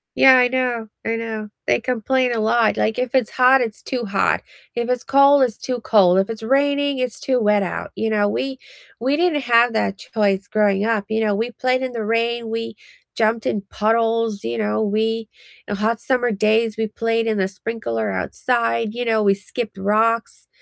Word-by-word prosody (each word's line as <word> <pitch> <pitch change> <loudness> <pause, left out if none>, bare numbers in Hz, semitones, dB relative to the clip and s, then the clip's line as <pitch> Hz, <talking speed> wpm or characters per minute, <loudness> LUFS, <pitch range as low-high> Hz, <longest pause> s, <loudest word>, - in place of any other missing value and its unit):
Yeah, 265 -1 +7
I 250 -1 +4
know, 245 -3 -1 0.2
I 225 0 0
know, 220 -2 -5 0.2
they 120 - +2
complain 255 +1 0
a 230 - -1
lot, 225 +1 +2
like, 220 +2 0
if 250 0 -2
it's 255 -4 +2
hot, 255 +1 +4
it's 225 -3 -3
too 250 -3 -3
hot, 200 -2 0 0.3
if 235 0 -2
it's 250 -1 -1
cold, 275 0 +5
it's 235 -4 +1
too 250 -2 -4
cold, 190 -5 +4
if 195 +2 +1
it's 225 -1 -6
raining, 280 +2 +1
it's 250 -2 -3
too 260 -2 0
wet 210 -2 +2
out, 180 - -4
you 220 0 -2
know, 205 -1 +2
we 265 +5 -3 0.4
we 265 +5 +1
didn't 330 -4 +1
have 240 0 +4
that 200 -2 -1
choice 200 -3 -1
growing 205 -2 +1
up, 220 -3 0
you 220 0 -1
know, 210 -2 +1
we 230 +3 -2
played 255 +1 0
in 255 -1 -3
the 225 -2 -4
rain, 230 +1 -1
we 230 -1 -4 0.4
jumped 220 0 0
in 205 - -1
puddles, 225 -1 0
you 115 0 -3
know, 105 - 0
we 220 +1 -1 0.4
on 205 - -2
hot 220 +2 -1
summer 245 -2 0
days, 215 +2 +1
we 225 0 -1
played 230 +1 -1
in 220 -2 0
the 190 - +1
sprinkler 185 - -4
outside, 230 - -1
you 245 0 -3
know, 220 -2 +1
we 200 -1 +4
skipped 215 +1 -6
rocks, 220 +3 0
225 Hz, 200 wpm, -20 LUFS, 215-245 Hz, 0.4 s, Yeah